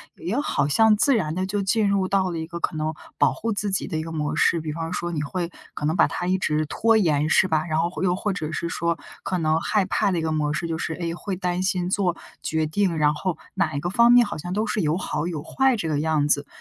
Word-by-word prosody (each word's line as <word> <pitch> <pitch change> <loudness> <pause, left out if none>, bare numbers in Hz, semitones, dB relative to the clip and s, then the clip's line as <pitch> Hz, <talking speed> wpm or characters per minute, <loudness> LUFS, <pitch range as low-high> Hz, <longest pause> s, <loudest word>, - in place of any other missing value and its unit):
也 205 +11 -2
好 145 - 0
像 220 +7 +5
自 275 +5 +4
然 160 -6 -1
地 185 +1 -1
就 200 +1 -1
进 210 +2 +2
入 195 -2 +1
到 190 -2 +1
了 165 - -3
一 160 - -5
个 170 0 -6
可 160 - -2
能 155 0 -2 0.2
保 - - +4
护 230 +1 -3
自 205 0 -1
己 190 - 0
的 160 -5 -3
一 155 - -2
个 165 - -7
模 150 -2 -2
式， 170 - +3
比 155 -1 -4
方 165 +2 -4
说， 175 -1 -3
你 150 -3 -2
会 175 +3 -3 0.2
可 150 - -3
能 160 +3 +1
把 - - +5
它 175 - -4
一 185 +1 +1
直 155 -1 0
拖 225 +8 +2
延， 155 -6 +2
是 190 - +4
吧？ 155 -1 +1
然 155 -1 0
后 170 +1 0
或 - - -6
又 180 -1 +2
或 200 +1 -2
者 155 -3 -4
是 170 +2 -2
说， 170 +1 -1 0.3
可 185 - -1
能 160 -1 +1
害 205 -3 +1
怕 200 +1 +1
的 180 - 0
一 - - 0
个 160 - -1
模 150 -1 0
式， 170 - -2
就 165 0 -3
是， 160 - -2
哎， 170 -2 -3
会 190 +2 -4
担 180 0 -2
心 185 -2 0
做 180 -4 +1 0.2
决 160 0 0
定， 170 +1 0
然 150 0 +3
后， 165 +2 -3 0.2
哪 155 -3 0
一 - - 0
个 175 +4 -3
方 235 +3 +5
面， 245 -1 +7
好 - - -5
像 175 +3 -5
都 215 +2 0
是 210 - -1
有 155 +2 +1
好 170 -3 -2
有 155 -4 -4
坏 265 -2 +2
这 170 -7 -3
个 150 -2 0
样 155 -2 +1
子。 145 -1 +1
170 Hz, 305 characters per minute, -24 LUFS, 155-195 Hz, 0.3 s, 面